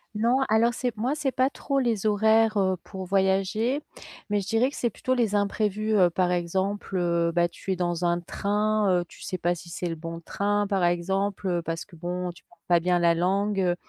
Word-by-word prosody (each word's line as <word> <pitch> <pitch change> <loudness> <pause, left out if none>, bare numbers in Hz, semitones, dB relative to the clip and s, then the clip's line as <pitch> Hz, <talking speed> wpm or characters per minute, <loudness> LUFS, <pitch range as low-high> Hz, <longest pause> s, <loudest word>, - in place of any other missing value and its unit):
Non, 235 +4 +2
alors 225 +2 +3
c'est 245 -1 -2
moi 245 +6 0
c'est 290 -3 -1
pas 260 +1 +2
trop 275 0 -3
les 230 -5 0
horaires, 220 +1 +3
heu, 190 -1 +2
pour 190 -2 -7
voyager. 195 +7 +1 0.5
Mais 205 0 +1
je 195 - -8
dirais 225 +5 +2
que - - -10
c'est 240 - 0
plutôt 255 +4 -2
les 230 -5 +1
imprévus, 210 +1 0
heu, 185 -4 +5
par 180 +1 0
exemple, 190 +3 -2
heu, 170 -1 +1
bah, 175 0 +3
tu 190 +2 -6
es - - +1
dans 175 -1 -2
un 175 0 +2
train, 210 +3 0
heu, - - -6
tu - - -16
sais 185 - -4
pas 175 0 +1
si 175 0 -10
c'est 175 +1 -4
le 165 - -3
bon 165 +1 -7
train 205 +4 0
par 195 -2 0
exemple, 190 +3 0
heu, 175 -2 0
parce 165 0 -4
que 185 - -16
bon, 180 +2 -3
tu 170 - -18
parles - - -23
pas 175 -1 +4
bien 180 +1 +2
la 170 -1 +4
langue. 195 +4 +1
Heu, 175 -1 +2
195 Hz, 225 wpm, -26 LUFS, 175-215 Hz, 0.5 s, heu